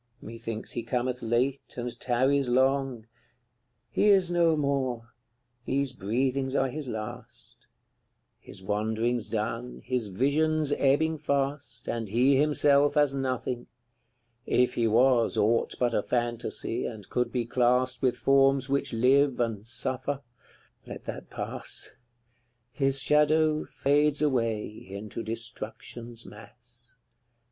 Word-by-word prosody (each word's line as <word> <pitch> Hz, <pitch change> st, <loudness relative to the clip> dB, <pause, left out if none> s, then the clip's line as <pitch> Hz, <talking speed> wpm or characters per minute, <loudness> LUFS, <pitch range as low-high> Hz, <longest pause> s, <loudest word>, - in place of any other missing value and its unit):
Methinks 115 Hz, 0 st, -6 dB
he 120 Hz, -, -3 dB
cometh 125 Hz, +2 st, -2 dB
late 125 Hz, +4 st, -1 dB
and 120 Hz, 0 st, -5 dB
tarries 130 Hz, +2 st, +1 dB
long. 130 Hz, -2 st, +1 dB, 0.9 s
He -, -, +2 dB
is 190 Hz, -3 st, +4 dB
no 170 Hz, -2 st, +3 dB
more 130 Hz, -5 st, -1 dB, 0.5 s
these 140 Hz, 0 st, 0 dB
breathings 130 Hz, +5 st, -1 dB
are 135 Hz, -1 st, +2 dB
his 150 Hz, +1 st, -5 dB
last; 110 Hz, -3 st, -8 dB, 0.7 s
His 95 Hz, -, -10 dB
wanderings 110 Hz, +3 st, -1 dB
done, 115 Hz, +3 st, -3 dB
his 125 Hz, -4 st, -1 dB
visions 145 Hz, +7 st, +1 dB
ebbing 155 Hz, +3 st, +2 dB
fast, 140 Hz, -3 st, -2 dB
And 115 Hz, -3 st, -3 dB
he 125 Hz, +6 st, +4 dB
himself 145 Hz, 0 st, +3 dB
as 145 Hz, -2 st, +4 dB
nothing: 130 Hz, -2 st, -3 dB, 0.8 s
if 125 Hz, 0 st, +2 dB
he 115 Hz, -1 st, +1 dB
was 120 Hz, +1 st, +3 dB
Aught 115 Hz, +3 st, +2 dB
but 120 Hz, -2 st, +1 dB
a -, -, +2 dB
phantasy, 120 Hz, 0 st, -2 dB
and 105 Hz, -4 st, -8 dB
could 125 Hz, 0 st, -1 dB
be 120 Hz, -2 st, -1 dB
classed 125 Hz, +1 st, +1 dB
With 130 Hz, -3 st, +1 dB
forms 135 Hz, -1 st, +3 dB
which 140 Hz, -2 st, -1 dB
live 130 Hz, +3 st, +3 dB
and 115 Hz, -3 st, -2 dB
suffer 130 Hz, +4 st, -2 dB, 0.6 s
let -, -, -8 dB
that -, -, -7 dB
pass -, -, -3 dB, 0.8 s
His 135 Hz, 0 st, 0 dB
shadow 155 Hz, +1 st, +3 dB
fades 145 Hz, +1 st, +1 dB
away 115 Hz, -7 st, +1 dB
into 105 Hz, +1 st, -8 dB
Destruction's 115 Hz, +1 st, -6 dB
mass, 120 Hz, +3 st, -16 dB
CLXV. -, -, -45 dB
125 Hz, 120 wpm, -28 LUFS, 115-140 Hz, 0.9 s, is